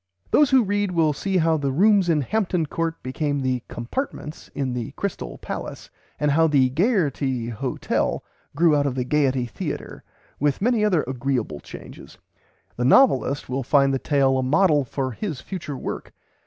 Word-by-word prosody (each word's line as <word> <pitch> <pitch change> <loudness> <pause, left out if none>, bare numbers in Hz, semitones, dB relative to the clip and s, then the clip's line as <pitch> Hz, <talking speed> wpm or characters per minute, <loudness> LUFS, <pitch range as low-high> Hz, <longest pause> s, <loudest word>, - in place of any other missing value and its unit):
Those 295 -2 +5
who 265 -2 +5
read 205 0 0
will 165 -4 +2
see 190 +6 -1
how 165 -2 +3
the 140 -2 -1
rooms 195 +4 +4
in 155 -3 +3
Hampton 180 - 0
Court 165 +2 -2
became 145 +2 -2
the 130 -2 -1
"compartments" 150 - -5
in 130 -3 -2
the 125 +1 -4
"Crystale" 185 - -4
Palace, - - -6 0.3
and 150 -1 +2
how 160 +3 +4
the 135 -4 +3
"Gaierty" 140 - 0
Hotel 125 +3 -2 0.3
grew 165 0 +4
out 145 -1 +2
of 130 - -2
the 130 - -1
Gaiety 135 -2 +1
Theatre, 120 - -6 0.4
with 145 -1 +1
many 230 +1 +2
other 185 -7 +2
agreeable 125 - -2
changes. - - -12 0.6
The 120 - -1
novelist 140 - +4
will 130 +2 -2
find 135 +1 +3
the 135 - 0
tale 135 -2 +2
a - - +1
model 150 +2 +3
for 130 +1 -3
his 155 - -5
future 155 -6 -6
work. - - -6
145 Hz, 170 wpm, -23 LUFS, 130-175 Hz, 0.6 s, Those